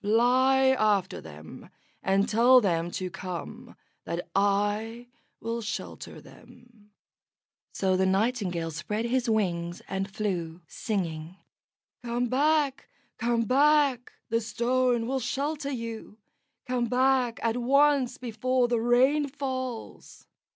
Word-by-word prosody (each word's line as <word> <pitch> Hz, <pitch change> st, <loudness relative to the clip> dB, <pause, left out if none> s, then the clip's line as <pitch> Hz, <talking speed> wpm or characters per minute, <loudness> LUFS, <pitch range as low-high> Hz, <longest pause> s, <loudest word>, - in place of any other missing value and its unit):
Fly 255 Hz, +5 st, +4 dB
after 215 Hz, -7 st, +1 dB
them 75 Hz, 0 st, -12 dB, 0.3 s
and 195 Hz, +1 st, +2 dB
tell 245 Hz, +4 st, +6 dB
them 170 Hz, -6 st, 0 dB
to 185 Hz, +1 st, -4 dB
come, 180 Hz, -1 st, -7 dB, 0.3 s
that 175 Hz, +1 st, -4 dB
I 205 Hz, +4 st, 0 dB, 0.3 s
will 230 Hz, +1 st, -3 dB
shelter 215 Hz, -, -6 dB
them." 235 Hz, -4 st, -18 dB, 0.8 s
So 190 Hz, -1 st, 0 dB
the 190 Hz, 0 st, +2 dB
Nightingale 190 Hz, -5 st, 0 dB
spread 210 Hz, +9 st, -3 dB
his 245 Hz, 0 st, 0 dB
wings, 175 Hz, -5 st, -1 dB
and 195 Hz, +1 st, -3 dB
flew, 180 Hz, -5 st, -3 dB
singing: 170 Hz, -5 st, -4 dB, 0.7 s
"Come 240 Hz, 0 st, -1 dB
back, 285 Hz, +1 st, +1 dB, 0.3 s
come 235 Hz, 0 st, +1 dB
back! 275 Hz, 0 st, +3 dB, 0.2 s
The 230 Hz, 0 st, +1 dB
Stone 240 Hz, +1 st, 0 dB
will 265 Hz, +2 st, -1 dB
shelter 280 Hz, +4 st, -2 dB
you. 230 Hz, -4 st, -6 dB, 0.5 s
Come 250 Hz, -1 st, 0 dB
back 255 Hz, -1 st, +2 dB
at 230 Hz, +1 st, 0 dB
once 275 Hz, 0 st, +3 dB
before 250 Hz, +1 st, 0 dB
the 240 Hz, -1 st, 0 dB
rain 260 Hz, +5 st, +3 dB
falls." 260 Hz, -4 st, -6 dB
235 Hz, 115 wpm, -27 LUFS, 200-255 Hz, 0.8 s, tell